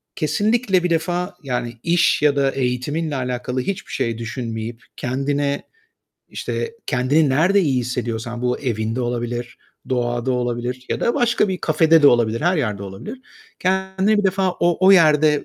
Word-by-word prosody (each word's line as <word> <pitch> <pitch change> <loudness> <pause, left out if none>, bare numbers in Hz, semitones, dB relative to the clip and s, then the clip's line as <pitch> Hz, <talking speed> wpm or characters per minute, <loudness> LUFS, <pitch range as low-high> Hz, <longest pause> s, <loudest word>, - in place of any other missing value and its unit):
kesinlikle 205 +3 +1
bir 180 - 0
defa 175 +3 -1
yani 125 -3 -3
iş 170 -3 +3
ya 145 -1 +3
da 135 -1 +2
eğitiminle 135 +5 -2
alakalı 125 0 -2
hiçbir 195 +8 -4
şey 115 -1 -1
düşünmeyip 115 0 -5
kendine, 140 +3 -1 0.7
işte 465 - -4
kendini 140 +4 +2
nerde 175 +9 +3
iyi 135 -7 +1
hissediyorsan, 120 -1 -4
bu 125 0 0
evinde 115 -2 -2
olabilir, 120 0 -3 0.3
doğada 120 0 -1
olabilir 125 +1 -3
ya - - -2
da 235 - +1
başka 235 -3 +2
bir 185 -1 -2
kafede 160 -2 +3
de - - +8
olabilir, 115 -1 +2
her 175 +3 +2
yerde 105 -9 -2
olabilir, 100 - -8 0.4
kendini 190 +3 +1
bir 205 - 0
defa 190 0 +2
o, 175 +1 +1
o 195 - +8
yerde 155 -4 +4
135 Hz, 150 wpm, -21 LUFS, 120-175 Hz, 0.7 s, de